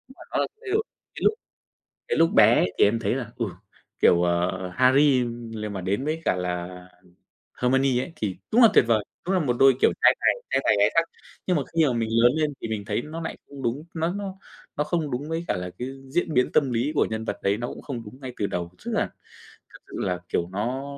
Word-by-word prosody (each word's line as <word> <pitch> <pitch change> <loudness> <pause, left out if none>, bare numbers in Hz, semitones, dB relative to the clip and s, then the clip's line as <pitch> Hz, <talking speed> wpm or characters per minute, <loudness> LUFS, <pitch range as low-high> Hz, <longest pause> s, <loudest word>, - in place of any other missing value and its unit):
mà - - -17
nó - - -1
là - - +1
thay 405 - -8
đổi, 440 +1 +2 0.3
cái - - -8
lúc 425 - +5 0.7
cái - - 0
lúc 165 +1 +4
bé - - +7
ấy 90 - +1
thì - - +7
em 115 +3 +2
thấy 120 - 0
là, 120 -4 -5
ừ, 115 - 0 0.6
kiểu, 85 0 +5
à, 85 0 +2 0.3
Harry 130 0 +4 0.3
lên 105 -1 -5
mà 95 - -4
đến 100 +9 -1
với 160 +1 -2
cả - - +2
là 90 -1 -3 0.9
Hermione 130 0 +3
ấy 165 - -9
thì 95 -4 -3 0.2
đúng 240 - +6
là 230 - +9
tuyệt - - +7
vời, 110 -3 +2 0.2
đúng 190 - 0
là - - +3
một 125 -5 0
đôi 135 -1 +7
kiểu - - +5
trai - - +6
tài - - +4 0.2
trai - - +2
tài 105 - +4
gái 100 - +5
sắc. 165 - +5 0.4
Nhưng 180 -3 +2
mà 140 - 0
khi 160 -2 +5
mà 125 - +1
mình 115 -1 -1
lớn 115 +2 +5
lên 155 -2 0
thì - - -3
mình 105 -2 -4
thấy 120 - -1
nó 160 +4 -7
nại 160 - -5
không 140 -2 -9
đúng, 120 +6 -1
nó 165 +2 -1
nó 195 -1 -5 0.4
nó 150 - +2
không 150 -1 -2
đúng 140 +5 -3
với 165 +1 -3
cả - - 0
là 90 0 -4
cái 125 - -3 0.2
diễn 165 +1 0
biến 125 -1 +2
tâm 135 -4 +3
lý 120 +6 0
của - - +3
nhân 110 0 -4
vật 105 - -3
đấy, 100 +1 +2
nó 120 - -3
cũng - - -8
không 125 -5 -6
đúng 130 +6 -12
ngay 130 -1 -6
từ 100 - 0
đầu, 85 0 -4
tức - - -3
là - - +2 0.7
thật - - -14
sự - - -12
là, 90 -1 -1
kiểu, 85 - -1
nó 125 +7 -2
125 Hz, 250 wpm, -25 LUFS, 105-150 Hz, 0.9 s, là